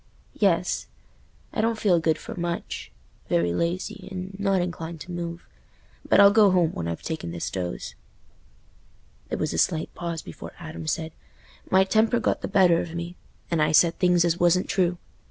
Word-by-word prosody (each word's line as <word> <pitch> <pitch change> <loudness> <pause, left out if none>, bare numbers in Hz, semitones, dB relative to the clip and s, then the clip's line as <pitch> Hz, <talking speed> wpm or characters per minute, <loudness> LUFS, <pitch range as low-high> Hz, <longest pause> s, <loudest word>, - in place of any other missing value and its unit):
"Yes: - - +1 0.7
I 215 - 0
don't 225 0 +1
feel 190 -6 +3
good 160 -1 +1
for - - -8
much—very 85 - -3
lazy, 170 - -2
and 190 0 -6
not 195 -2 +2
inclined 170 -2 -4
to 180 - -8
move; 170 -1 -5 0.6
but - - +5
I'll 200 0 +9
go 210 -1 +6
home 180 -3 +3
when 85 - -4
I've 85 -1 -4
taken 160 - -4
this 85 0 -4
dose." 90 -10 -4 1.4
There - - -2
was - - -1
a 80 - -1
slight 160 - +1
pause 170 -2 -4
before - - -9
Adam 160 -2 -8
said, 160 +1 -2 0.6
"My 190 +1 +5
temper 220 +4 +2
got - - 0
the - - -3
better 185 -4 +4
of 165 -1 -7
me, 170 +1 -5 0.4
and 165 -2 +2
I 155 0 +3
said 165 +1 +4
things 180 -2 +4
as 170 0 +1
wasn't 175 +1 +3
true. 180 -2 +1
170 Hz, 175 wpm, -25 LUFS, 160-185 Hz, 1.4 s, I'll